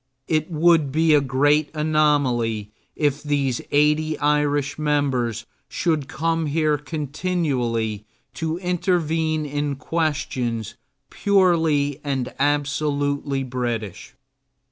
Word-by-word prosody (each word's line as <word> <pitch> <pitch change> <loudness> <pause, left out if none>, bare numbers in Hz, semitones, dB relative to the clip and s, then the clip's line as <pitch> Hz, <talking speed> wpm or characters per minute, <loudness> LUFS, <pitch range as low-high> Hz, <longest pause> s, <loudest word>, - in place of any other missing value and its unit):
It 155 0 0
would 160 -3 +3
be 160 +2 +3
a 145 - +5
great 145 +3 +2
anomaly 140 -9 +1 0.2
if 145 -1 0
these 140 -4 0
eighty 150 +2 +2
Irish 145 -1 +1
members 130 -7 0 0.2
should 155 -5 -1
come 165 0 -1
here 150 0 +1
continually 140 - -2 0.3
to 165 0 -3
intervene 165 -4 0
in 145 0 -2
questions 135 -7 -2 0.4
purely 165 -8 +2
and 135 -3 -2
absolutely 145 -1 0
British. 120 -2 -4
145 Hz, 95 wpm, -22 LUFS, 135-155 Hz, 0.4 s, a